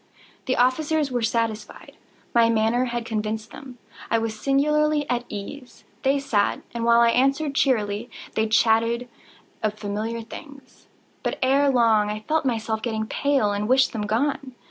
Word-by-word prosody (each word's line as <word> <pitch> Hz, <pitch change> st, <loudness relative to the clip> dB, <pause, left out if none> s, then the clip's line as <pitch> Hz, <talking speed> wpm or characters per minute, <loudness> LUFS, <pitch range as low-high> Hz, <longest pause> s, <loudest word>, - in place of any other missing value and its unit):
The 255 Hz, -, +1 dB
officers 290 Hz, +3 st, +1 dB
were 245 Hz, -1 st, -1 dB
satisfied. 225 Hz, -1 st, -3 dB, 0.4 s
My 230 Hz, -1 st, +5 dB
manner 230 Hz, +2 st, +2 dB
had 240 Hz, -1 st, -3 dB
convinced 215 Hz, -1 st, -3 dB
them. 260 Hz, -4 st, -11 dB, 0.3 s
I 230 Hz, -, +2 dB
was 225 Hz, -1 st, -2 dB
singularly 295 Hz, +4 st, +1 dB
at 245 Hz, 0 st, -1 dB
ease. 245 Hz, +6 st, -8 dB, 0.2 s
They 275 Hz, +1 st, +2 dB
sat, 220 Hz, -7 st, 0 dB
and 235 Hz, -1 st, -3 dB
while 235 Hz, 0 st, +5 dB
I 235 Hz, 0 st, +5 dB
answered 275 Hz, +4 st, +1 dB
cheerily, 230 Hz, -4 st, 0 dB, 0.2 s
they 220 Hz, 0 st, +1 dB
chatted 230 Hz, +2 st, +2 dB, 0.5 s
of 215 Hz, -1 st, -1 dB
familiar 215 Hz, +2 st, -4 dB
things. 275 Hz, +3 st, -13 dB, 0.3 s
But, -, -, -2 dB
ere 275 Hz, +2 st, +3 dB
long, 225 Hz, -5 st, +3 dB
I 210 Hz, 0 st, -4 dB
felt 315 Hz, -2 st, +1 dB
myself 220 Hz, -3 st, -1 dB
getting 220 Hz, -2 st, -2 dB
pale 275 Hz, -3 st, +1 dB
and 205 Hz, +2 st, -2 dB
wished 260 Hz, 0 st, +4 dB
them 210 Hz, -2 st, -3 dB
gone. 260 Hz, +3 st, -1 dB
235 Hz, 155 wpm, -24 LUFS, 220-270 Hz, 0.5 s, My